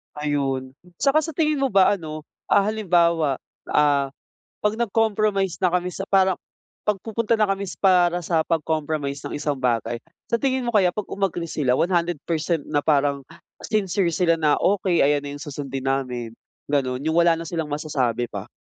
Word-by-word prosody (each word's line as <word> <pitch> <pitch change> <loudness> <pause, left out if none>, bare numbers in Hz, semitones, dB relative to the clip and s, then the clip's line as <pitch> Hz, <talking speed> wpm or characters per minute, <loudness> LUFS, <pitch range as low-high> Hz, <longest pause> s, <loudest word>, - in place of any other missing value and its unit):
Ayun. 140 -3 -1 0.3
Saka 280 +2 +4
sa 315 +1 -4
tingin 305 -2 +1
mo 270 - +2
ba, 200 -1 +4
ano, 155 -1 -7 0.2
ah, 200 - +4
halimbawa, 170 -8 +2 0.3
ah, 145 -2 +3 0.5
'pag 210 +1 0
nag-compromise 215 -4 +1
na 180 - +4
kami 180 0 0
sa 195 - -4
parang, 190 -2 +4 0.5
'pag 210 -2 0
pupunta 225 +2 -1
na 215 - +4
kami 195 0 -1 0.2
para 180 -2 +4
sa 165 -2 0
pag-compromise 155 -3 -2
ng - - -5
isang 145 -1 -1
bagay, 120 -3 0 0.3
sa 235 - +1
tingin 260 -2 0
mo 235 - -1
kaya 185 -4 +4
pag 210 +1 -5
umagree 180 -4 -2
sila, 130 -5 0
one 175 - +2
hundred 170 -2 +1
percent 160 -1 -1
na 145 -1 0
parang 140 -2 +2 0.4
sincere 195 -4 0
sila 165 0 +2
na, 155 -2 +2
"Okey, 185 -3 +2
ayan 145 0 +3
na 145 - -5
'yung - - -9
susundin 135 -3 -5
namin." 125 -4 -2 0.3
Gano'n, 130 -3 0
'yung 160 +2 -1
wala 170 0 +5
na 165 - -6
silang 160 -3 -3
masasabi 130 -6 -1
pa? - - -7
165 Hz, 175 wpm, -23 LUFS, 145-195 Hz, 0.5 s, wala